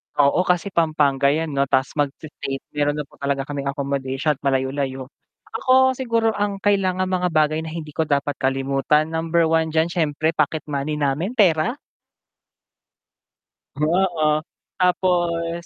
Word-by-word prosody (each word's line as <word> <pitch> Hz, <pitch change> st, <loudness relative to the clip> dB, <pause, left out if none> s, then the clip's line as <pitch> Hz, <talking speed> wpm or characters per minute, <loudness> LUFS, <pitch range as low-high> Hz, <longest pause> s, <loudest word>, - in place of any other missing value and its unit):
Oo, 145 Hz, +6 st, +3 dB
kasi 180 Hz, +2 st, +1 dB
Pampanga 150 Hz, -5 st, +2 dB
yan 160 Hz, 0 st, -2 dB
'no, 140 Hz, 0 st, +1 dB
tas 130 Hz, +1 st, +1 dB
mag-fe-faith, 145 Hz, -1 st, -3 dB
meron 145 Hz, 0 st, 0 dB
na 150 Hz, -, -3 dB
po -, -, -22 dB
talaga 140 Hz, -1 st, -1 dB
kaming 140 Hz, -1 st, -4 dB
accommodation 140 Hz, +1 st, -1 dB
at 135 Hz, -, -28 dB
malayo-layo. 135 Hz, 0 st, -1 dB, 0.5 s
Ako 260 Hz, 0 st, +4 dB
siguro 230 Hz, -3 st, +1 dB
ang 205 Hz, -1 st, -2 dB
kailangang 185 Hz, -2 st, +1 dB
mga 180 Hz, -1 st, +1 dB
bagay 155 Hz, 0 st, +2 dB
na 160 Hz, -, -6 dB
hindi 160 Hz, -2 st, -7 dB
ko 160 Hz, -, +1 dB
dapat 140 Hz, 0 st, 0 dB
kalimutan, 135 Hz, +3 st, +1 dB
number 165 Hz, 0 st, +1 dB
1 160 Hz, 0 st, +1 dB
diyan, 160 Hz, +1 st, +2 dB
siyempre 160 Hz, -1 st, 0 dB
pocket 155 Hz, +1 st, 0 dB
money 145 Hz, +1 st, -2 dB
namin 150 Hz, -, 0 dB
pera. 195 Hz, +1 st, +3 dB, 2.0 s
Oo. 155 Hz, 0 st, +1 dB, 0.4 s
Tapos 175 Hz, -2 st, 0 dB
155 Hz, 140 wpm, -22 LUFS, 140-175 Hz, 2.0 s, Ako